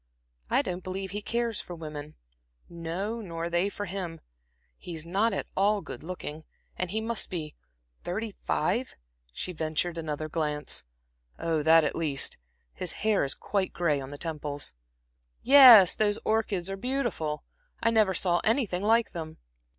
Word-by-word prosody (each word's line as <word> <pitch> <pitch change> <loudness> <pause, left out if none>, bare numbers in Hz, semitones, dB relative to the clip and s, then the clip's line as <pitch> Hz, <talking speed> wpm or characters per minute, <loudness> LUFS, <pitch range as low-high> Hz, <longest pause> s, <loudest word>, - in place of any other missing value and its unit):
I - - +3
don't 180 0 -4
believe 190 +1 -4
he 205 +1 -4
cares 235 0 -1
for 175 - -8
women 150 -2 -8 0.5
no, 175 +7 -4
nor 170 -3 -4
they 175 +4 +2
for 205 0 -5
him. 175 -3 -5 0.6
He's 165 - -7
not 200 +7 +1
at - - -2
all 205 +1 +2
good - - -8
looking, 160 -2 -7 0.3
and 180 - -3
he 215 +4 -1
must 225 0 -2
be 155 -4 -4 0.5
thirty 210 +4 -3
five" 235 +11 0 0.4
she 180 - -5
ventured 160 +1 -2
another 155 -1 -3
glance. 150 -2 -2 0.5
"Oh, 165 -2 0
that, 160 +1 +6
at - - -1
least. 150 -5 0 0.4
His - - -3
hair 215 -2 +3
is 140 - -1
quite 195 -2 -2
gray 150 -5 +1
on 135 - -7
the 145 - -7
temples. 150 -2 -3 0.7
'Yes, 250 -9 +10
those 210 -1 +1
orchids 210 -5 0
are 195 0 -4
beautiful. 205 - -2 0.4
I 230 - +4
never 215 -4 +3
saw 175 -2 +2
anything 220 -6 +1
like 225 +2 +3
them.' 160 -2 -7
180 Hz, 155 wpm, -28 LUFS, 160-210 Hz, 0.7 s, Yes